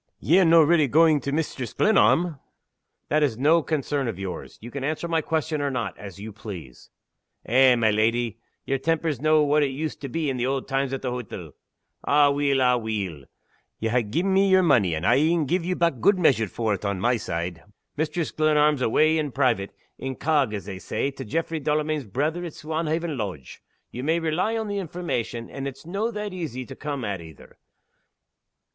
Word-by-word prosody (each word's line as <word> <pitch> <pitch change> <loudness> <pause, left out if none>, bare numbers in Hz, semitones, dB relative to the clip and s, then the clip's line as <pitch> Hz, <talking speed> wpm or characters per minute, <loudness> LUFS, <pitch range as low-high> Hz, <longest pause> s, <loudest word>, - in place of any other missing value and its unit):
"Ye're 180 +5 +4
no' 165 0 +7
reely 155 -1 +4
going 155 +2 +4
to 140 - -4
Mistress 140 -6 -3
Glenarm?" 175 -7 +3 0.7
"That 155 +1 +2
is 135 -7 +1
no 155 +6 +4
concern 145 -3 -1
of 110 - -3
yours. 95 -1 -6
You 120 +2 -10
can 140 0 -5
answer 155 +4 -2
my 165 -1 +1
question 155 -1 -1
or 140 - 0
not, 120 -7 -3
as 100 -3 -10
you 105 +1 -8
please." 90 - -10 0.6
"Eh, 130 +1 +5
my 110 -2 +3
leddy! 115 +1 0 0.3
yer 135 0 -1
temper's 160 -3 -1
no' 155 0 +4
what 150 +1 +3
it 145 - +2
used 150 +3 -5
to 140 - -5
be 155 +4 -2
in 135 -2 -1
the 125 +1 0
auld 135 0 -2
times 135 0 -1
at 135 - -4
the 125 - -1
hottle. 125 -4 -6 0.5
Aweel! 145 -1 +3
aweel! 110 - 0 0.5
ye 115 - -2
ha' 120 +2 +2
gi'en 180 - 0
me 195 +1 +4
yer 190 0 +5
money, 115 - +3
and 80 +3 -3
I'll 135 - +4
een 160 +1 +2
gi' 175 +6 +1
ye 180 +1 -2
back 170 -8 +1
gude 200 -1 +4
measure 135 -11 +3
for 110 +3 -1
it, 100 - -4
on 100 -2 -1
my 120 +6 +2
side. 85 -4 -4 0.3
Mistress 155 +2 -2
Glenarm's 150 -2 +2
awa' 155 +7 +3
in 150 -2 -2
private 120 -7 +1 0.3
incog, 135 -1 0
as 100 - -6
they 95 -2 -7
say 140 - -2
to 135 - -8
Jaffray 160 +7 -2
Delamayn's 150 -1 -1
brither 150 - -2
at 170 -3 -6
Swanhaven 160 0 -2
Lodge. 95 - -6 0.3
Ye 125 - -6
may 160 +5 +1
rely 170 +8 0
on 220 -1 -3
the 205 -1 -2
information, 150 - -4
and 135 0 -6
it's 135 +3 -9
no' 200 +7 -2
that 210 -3 -5
easy 145 -8 -5
to - - -10
come 140 -5 -4
at 100 -4 -3
either. 80 -3 -14
140 Hz, 195 wpm, -25 LUFS, 115-160 Hz, 0.7 s, no